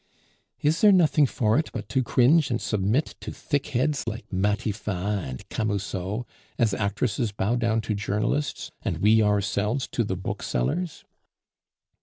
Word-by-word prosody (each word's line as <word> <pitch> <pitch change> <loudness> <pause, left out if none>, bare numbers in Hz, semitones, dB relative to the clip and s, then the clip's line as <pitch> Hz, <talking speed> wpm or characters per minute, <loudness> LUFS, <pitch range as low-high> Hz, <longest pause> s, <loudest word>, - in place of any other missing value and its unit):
"Is 155 +3 +2
there 210 - +8
nothing 160 -6 +4
for 110 -1 +2
it 160 - -2
but 105 -4 -5
to 130 +4 +1
cringe 130 +5 +4
and 120 -2 0
submit 110 +8 0
to - - -7
thickheads 145 -1 -1
like 115 +1 -4
Matifat 100 0 -1
and 65 - -8
Camusot, 100 0 -2 0.3
as 115 -4 +2
actresses 105 +3 -1
bow 100 +3 0
down 115 -2 +1
to 110 - -2
journalists, 105 +8 -2
and - - -2
we 110 +3 +4
ourselves 105 +4 +1
to 120 - 0
the 95 -4 -3
booksellers?" 145 - -2
110 Hz, 140 wpm, -26 LUFS, 100-130 Hz, 0.3 s, there